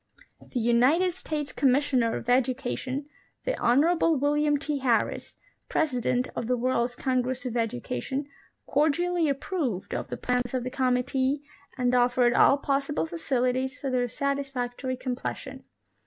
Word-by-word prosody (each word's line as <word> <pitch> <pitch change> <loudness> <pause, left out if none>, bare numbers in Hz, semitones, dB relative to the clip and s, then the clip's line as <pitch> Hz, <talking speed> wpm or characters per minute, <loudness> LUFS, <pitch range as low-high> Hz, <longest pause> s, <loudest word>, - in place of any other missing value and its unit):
■ - - -23
The 250 - -1
United 250 +11 +3
States 300 -4 -4
Commissioner 260 -4 +2
of - - -6
Education, 255 +2 0 0.4
the - - 0
Honorable 320 +6 +3
William 295 +1 +2
T. 295 0 -3
Harris, 245 -4 0 0.3
President 250 -4 0
of 230 - -3
the 250 0 +1
World's 245 0 0
Congress 255 0 -1
of 250 - -3
Educa 215 - -2
tion, 275 - -3 0.4
cordially 325 +3 +2
approved 275 - -2
of - - -3
the - - -5
plans 250 0 -1
of 255 - -1
the 255 - -4
committee 260 +2 0 0.3
and 250 -1 +1
offered 245 0 +4
all 275 - +6
possible 275 - -1
facilities 255 - -1
for 270 - -3
their 250 -1 +1
satisfactory 260 -1 -2
completion. 260 +1 -5
260 Hz, 140 wpm, -27 LUFS, 245-285 Hz, 0.4 s, all